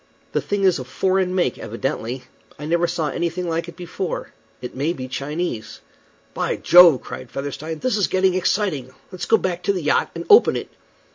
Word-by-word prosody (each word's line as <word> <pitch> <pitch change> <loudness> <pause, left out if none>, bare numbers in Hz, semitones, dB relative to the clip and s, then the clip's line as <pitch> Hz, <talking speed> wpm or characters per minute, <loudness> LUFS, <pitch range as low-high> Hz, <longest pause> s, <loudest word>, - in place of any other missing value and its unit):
The - - 0
thing 205 -1 -2
is 185 -5 +3
of 130 - -7
foreign 185 +5 0
make, 175 -10 0
evidently. 125 +3 -4 0.3
I 150 - -7
never 170 +2 +1
saw 170 -3 -1
anything 170 +4 -2
like 165 +1 -2
it 170 - -11
before. 180 +1 -5 0.3
It 125 - -7
may 145 +6 0
be 130 -5 -6
Chinese." 140 -3 -4 0.5
"By - - -1
Jove!" 175 -6 +7
cried 130 - -8
Featherstone, 145 +3 -5
"this 235 +6 0
is 200 - +2
getting 185 0 +2
exciting. 180 -7 0 0.2
Let's 185 - -5
go 225 - +4
back 180 -3 -2
to 200 - +1
the 180 -4 -3
yacht 145 - +2
and - - -5
open 430 +1 +7
it." - - -5
170 Hz, 190 wpm, -22 LUFS, 140-185 Hz, 0.5 s, Jove